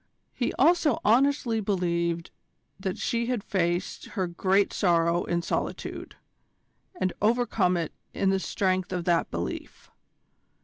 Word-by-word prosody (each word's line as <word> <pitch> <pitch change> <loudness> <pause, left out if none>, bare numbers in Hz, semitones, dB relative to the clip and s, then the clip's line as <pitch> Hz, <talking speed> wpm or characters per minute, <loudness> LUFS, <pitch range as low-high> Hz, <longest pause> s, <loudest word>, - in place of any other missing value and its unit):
He - - -1
also 335 -6 +3
honestly 245 0 +3
believed 170 -4 -1 0.5
that 190 -1 -3
she 235 -1 -1
had 245 -5 -1
faced 175 -2 -1
her 190 -4 -2
great 190 +3 +1
sorrow 170 -2 +2
in 170 0 -1
solitude, - - -4 0.8
and 185 - 0
overcome 215 -5 +2
it 165 -2 -3 0.2
in 195 -1 +1
the 195 - +1
strength 185 -1 -1
of 180 -2 -2
that 170 -2 +2
belief. 85 +1 -6
185 Hz, 125 wpm, -27 LUFS, 175-220 Hz, 0.8 s, also